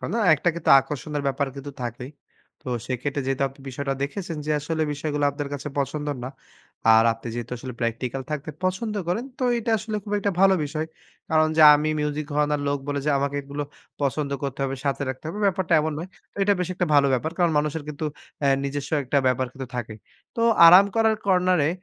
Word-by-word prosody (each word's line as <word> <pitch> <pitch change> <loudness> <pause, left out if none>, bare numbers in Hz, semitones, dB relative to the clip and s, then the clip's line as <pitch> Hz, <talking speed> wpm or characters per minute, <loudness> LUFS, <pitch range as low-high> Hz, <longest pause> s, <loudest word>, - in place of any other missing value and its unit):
করে - - -4
না - - +1
একটা 155 +4 0
কিন্তু 170 -1 -1
আকর্ষণের 145 +2 -5
ব্যাপার 140 +1 0
কিন্তু 140 +1 -7
থাকেই। 120 +2 -5 0.5
তো, - - -25 0.2
সেক্ষেত্রে 135 +3 -2
যেহেতু 135 0 0
আপনি 135 +1 -19
বিষয়টি 135 +1 -3
দেখেছেন 170 +3 -4
যে - - -1
আসলে 160 +2 -2
বিষয়গুলো 145 0 -2
আপনার 145 0 -5
কাছে 145 +1 -5
পছন্দ 140 +2 -2 0.2
না, - - -3 0.7
আর 110 0 +6
আপনি 115 +1 -11
যেহেতু 120 0 -5
আসলে 130 +1 -7
প্র্যাকটিক্যাল 120 +3 -2
থাকতে 150 0 -3
পছন্দ 200 +4 -1
করেন, 215 +8 -1
তো 255 - -1
এটা 230 0 -2
আসলে 215 +1 -4
খুব 205 - -6
একটা 200 0 0
ভালো 195 0 +6
বিষয়। 155 +2 -3 0.4
কারণ 155 0 +4
যে, 160 - +6
আমি 150 +1 +1
মিউজিক 150 0 -2
ধরণের 150 0 +1
লোক 140 0 0
বলে 145 0 -1
যে - - +3
আমাকে 140 +1 -1
এগুলো 140 +1 -5 0.4
পছন্দ 140 +1 -1
করতে 135 -2 -4
হবে 135 0 -1
বা - - -12
সাথে 140 0 0
রাখতে 130 +3 -9
হবে, 170 - -5
ব্যাপারটা 190 -3 0
এমন 155 0 -1
নয়। 170 - -6 0.3
এটা 200 +1 +4
বেশ 180 -1 -1
একটা 180 -1 0
ভালো 140 -1 +6
ব্যাপার, 155 +5 -1
কারণ 175 -2 +3
মানুষের 150 +1 -1
কিন্তু 150 +1 -5 0.4
অ্যা 140 - +2 0.2
নিজস্ব 140 0 -4
একটা 135 +3 +1
ব্যাপার 130 0 +2
কিন্তু 135 0 -7
থাকেই। 110 -2 -5 0.4
তো, 230 - 0 0.2
আরাম 180 +4 +9
করার 220 -1 +3
কর্নারে 180 -5 +3
145 Hz, 205 wpm, -24 LUFS, 135-165 Hz, 0.7 s, আরাম